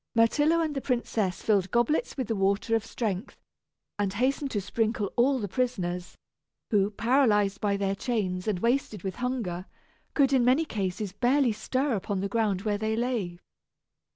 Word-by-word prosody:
Myrtillo 295 Hz, +9 st, +4 dB
and 315 Hz, -2 st, -1 dB
the 275 Hz, -, -3 dB
princess 225 Hz, -8 st, -1 dB
filled 200 Hz, -4 st, +2 dB
goblets 240 Hz, -, +1 dB
with 260 Hz, -4 st, -2 dB
the 225 Hz, -, -1 dB
water 200 Hz, +3 st, +1 dB
of 225 Hz, -, 0 dB
strength, 225 Hz, -1 st, -3 dB, 0.6 s
and 200 Hz, -2 st, 0 dB
hastened 270 Hz, +6 st, 0 dB
to 210 Hz, -, -1 dB
sprinkle 215 Hz, +1 st, -1 dB
all 265 Hz, +3 st, +3 dB
the 210 Hz, -5 st, -3 dB
prisoners, 180 Hz, -7 st, -2 dB, 0.5 s
who, 200 Hz, -2 st, +3 dB
paralyzed 210 Hz, -3 st, +2 dB
by 200 Hz, -1 st, +1 dB
their 195 Hz, -1 st, 0 dB
chains 195 Hz, -4 st, -2 dB
and 195 Hz, -4 st, 0 dB
wasted 235 Hz, -5 st, 0 dB
with 190 Hz, -1 st, -4 dB
hunger, 230 Hz, -8 st, -3 dB, 0.5 s
could 275 Hz, -2 st, +4 dB
in 260 Hz, -2 st, +4 dB
many 260 Hz, +7 st, +3 dB
cases 195 Hz, -, -3 dB
barely 250 Hz, +3 st, +3 dB
stir 260 Hz, +5 st, -1 dB
upon 200 Hz, -1 st, -2 dB
the 195 Hz, -, -1 dB
ground 200 Hz, -3 st, 0 dB
where 205 Hz, -1 st, 0 dB
they 220 Hz, +1 st, 0 dB
lay. 225 Hz, -7 st, -1 dB
220 Hz, 165 wpm, -28 LUFS, 195-250 Hz, 0.6 s, Myrtillo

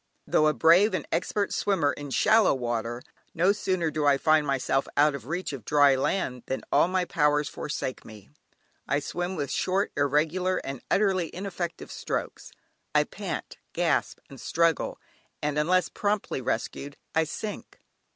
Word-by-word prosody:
Though 155 Hz, -, +3 dB
a 155 Hz, -, +3 dB
brave 175 Hz, +7 st, +5 dB
and -, -, -4 dB
expert 205 Hz, -1 st, -1 dB
swimmer 165 Hz, -9 st, +1 dB
in 145 Hz, +1 st, -7 dB
shallow 220 Hz, +6 st, +4 dB
water, 120 Hz, -1 st, -3 dB, 0.3 s
no 180 Hz, +4 st, +4 dB
sooner 185 Hz, -5 st, -1 dB
do 155 Hz, -1 st, -2 dB
I 140 Hz, -1 st, +5 dB
find 155 Hz, +1 st, +3 dB
myself 135 Hz, 0 st, 0 dB
out 145 Hz, +1 st, +5 dB
of 130 Hz, -4 st, -7 dB
reach 175 Hz, 0 st, -3 dB
of 130 Hz, -5 st, -7 dB
dry 145 Hz, +2 st, +5 dB
land, 130 Hz, -2 st, -1 dB
than 130 Hz, -, -3 dB
all -, -, +4 dB
my 185 Hz, 0 st, 0 dB
powers 150 Hz, -3 st, +2 dB
forsake 140 Hz, -3 st, -4 dB
me. 105 Hz, -10 st, -14 dB, 0.6 s
I 145 Hz, +2 st, +1 dB
swim 175 Hz, +5 st, -4 dB
with 145 Hz, -5 st, -3 dB
short, 190 Hz, +2 st, 0 dB
irregular, 160 Hz, +6 st, +1 dB
and 135 Hz, -2 st, -6 dB
utterly 190 Hz, -5 st, +2 dB
ineffective 180 Hz, -2 st, -5 dB
strokes, -, -, -4 dB, 0.4 s
I -, -, +6 dB
pant, -, -, -6 dB, 0.2 s
gasp -, -, 0 dB
and 135 Hz, -3 st, -12 dB
struggle, 165 Hz, -1 st, +1 dB, 0.4 s
and 150 Hz, 0 st, -1 dB
unless 175 Hz, +3 st, +2 dB
promptly 205 Hz, -9 st, -2 dB
rescued, 140 Hz, +4 st, -3 dB, 0.2 s
I 160 Hz, 0 st, +2 dB
sink. 205 Hz, +6 st, -6 dB
155 Hz, 155 wpm, -27 LUFS, 140-185 Hz, 0.6 s, I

